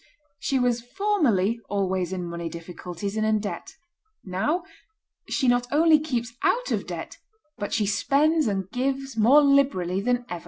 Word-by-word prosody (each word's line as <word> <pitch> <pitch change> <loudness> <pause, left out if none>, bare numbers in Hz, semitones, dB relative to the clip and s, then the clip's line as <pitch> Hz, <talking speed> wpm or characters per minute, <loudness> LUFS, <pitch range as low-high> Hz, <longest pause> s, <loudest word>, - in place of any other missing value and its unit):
She 275 - 0
was 245 -2 +1
formerly 245 - +1
always 190 -3 -1
in 180 -2 -3
money 170 -1 -5
difficulties 175 +4 -6
and 215 - 0
in 215 0 +2
debt; 205 - -6 0.5
now, 220 - -1 0.7
she 265 - 0
not 245 0 +2
only 310 +1 +5
keeps 245 -6 -3
out - - +1
of - - -1
debt, - - -7 0.4
but 205 - -4
she 215 - +1
spends 285 +9 +2
and 195 -3 -1
gives 270 0 -2
more 250 +7 +6
liberally 265 -11 +2
than 245 +2 0
ever." 175 - -5
235 Hz, 155 wpm, -25 LUFS, 190-280 Hz, 0.7 s, more